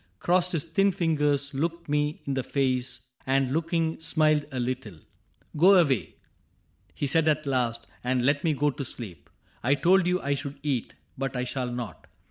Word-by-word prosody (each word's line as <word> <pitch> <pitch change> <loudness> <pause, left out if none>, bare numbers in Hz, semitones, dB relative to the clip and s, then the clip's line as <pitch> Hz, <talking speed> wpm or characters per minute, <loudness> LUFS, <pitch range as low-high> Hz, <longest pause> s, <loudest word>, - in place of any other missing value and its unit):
Crossed 180 - +2
his 160 -4 0
thin 195 +5 +2
fingers, 150 -5 +1
looked 165 +4 -2
me 150 0 -1
in 140 - -1
the 135 - 0
face, 130 -1 -1 0.2
And 135 -1 +2
looking 165 0 0
smiled 155 -2 +2
a 130 - -3
little. 125 -4 -3
^^ 80 - -17 0.6
Go 185 +6 +6
away," 145 - +2 0.8
He - - -2
said 160 +3 +3
at 155 0 +2
last, 120 -4 0
^^ - - -18 0.2
and 125 0 +1
let 140 +1 +2
me 160 -3 +2
go 145 +2 +2
to 140 - -5
sleep. 95 - -8 0.3
I 135 +4 +3
told 175 +5 +4
you 180 0 +2
I 140 -3 -1
should 140 0 -4
eat, 135 -6 -2 0.2
but 135 -1 -2
I 125 - -1
shall 125 -1 -2
not. 120 -3 -6
140 Hz, 185 wpm, -27 LUFS, 130-160 Hz, 0.8 s, Go